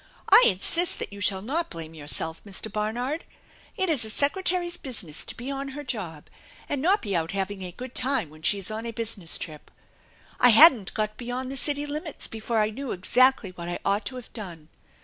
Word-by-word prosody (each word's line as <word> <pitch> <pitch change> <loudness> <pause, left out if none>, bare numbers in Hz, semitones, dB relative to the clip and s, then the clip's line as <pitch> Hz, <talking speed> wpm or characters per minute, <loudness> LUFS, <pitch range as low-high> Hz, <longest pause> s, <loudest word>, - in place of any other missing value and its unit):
I - - +9
insist 335 - +1
that - - -6
you 200 - -9
shall 195 -2 +1
not 320 +9 -1
blame 165 -1 -8
yourself, 160 +1 -3
Mr. 205 +1 -6
Barnard. 245 +9 -2 0.5
It 380 -2 +1
is 305 -9 +3
a 220 - -1
secretary's 350 - 0
business 205 - -3
to - - -6
be 250 +4 -5
on 275 0 -4
her 295 - -5
job 185 - -5 0.4
and 285 -2 -2
not 375 +7 +3
be 200 -4 -1
out 165 +2 -1
having 195 0 -3
a 180 -1 -5
good 250 +6 -9
time 255 - +1
when 155 0 -15
she 200 - +3
is 195 +2 -1
on 220 +2 -4
a - - -3
business 220 -7 -1
trip. 155 -4 -8 0.7
I 250 - +7
hadn't 240 - +8
got 215 0 -2
beyond 250 +2 -4
the - - -5
city 290 +2 0
limits 300 +1 -4
before 225 +1 -3
I 215 0 +2
knew 270 +3 -5
exactly 245 +2 +3
what 175 -1 -7
I 175 - -2
ought 200 +2 +1
to 260 - -6
have 250 -2 -10
done. 170 -8 -8
225 Hz, 205 wpm, -26 LUFS, 190-275 Hz, 0.7 s, I